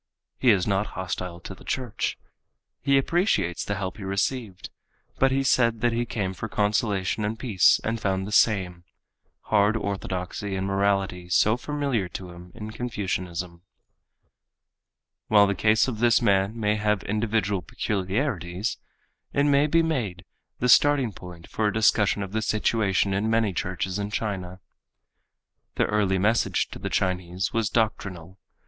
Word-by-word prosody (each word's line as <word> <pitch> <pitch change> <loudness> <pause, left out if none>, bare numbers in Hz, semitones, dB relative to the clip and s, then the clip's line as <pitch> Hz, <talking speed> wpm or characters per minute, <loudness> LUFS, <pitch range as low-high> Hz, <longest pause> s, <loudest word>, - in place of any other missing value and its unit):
He 130 - +4
is 95 -5 +4
not 100 +1 0
hostile 90 -1 -4
to 95 - -8
the - - -16
church. 125 -4 -2 0.6
He 140 0 +3
appreciates 135 - +1
the 100 - -2
help 95 -1 -4
he 105 - -8
received, 100 +1 -2 0.5
but 135 - +5
he 135 +1 +1
said 115 -4 +2
that 120 0 +2
he 120 +1 -1
came 95 -5 -2
for 110 +4 -6
consolation 105 -1 0
and 105 +2 -2
peace 110 -7 +4
and 115 +1 -2
found 95 -1 0
the 105 - -6
same—hard 100 +2 0
orthodoxy 95 -1 -4
and 95 0 -2
morality 95 -2 0
so 110 +5 +4
familiar 135 -7 -2
to 90 -1 -7
him 90 +1 -12
in 105 0 -7
Confucianism. 90 -7 -4 1.7
While 105 -1 +6
the 100 - +1
case 110 +4 +3
of 115 -5 -4
this 120 -1 +4
man 100 +3 +1
may 105 -1 +1
have 105 -1 0
individual 105 -2 0
peculiarities, 95 - -2 0.5
it 140 - +2
may 145 0 +4
be 165 +2 +3
made 110 - -2 0.3
the 125 - 0
starting 135 -3 +4
point 90 -2 -11
for 110 - -1
a - - +1
discussion 105 -2 +3
of 95 - -7
the 110 +1 -1
situation 105 -3 +1
in 100 +3 0
many 115 -3 +2
churches 95 +2 -3
in 100 0 -3
China. 95 -4 -4 1.1
The - - +2
early 100 -2 +1
message 110 +5 +1
to - - -9
the - - -4
Chinese 90 0 -1
was 115 -3 +1
doctrinal. 100 -5 -2
105 Hz, 150 wpm, -25 LUFS, 95-115 Hz, 1.7 s, While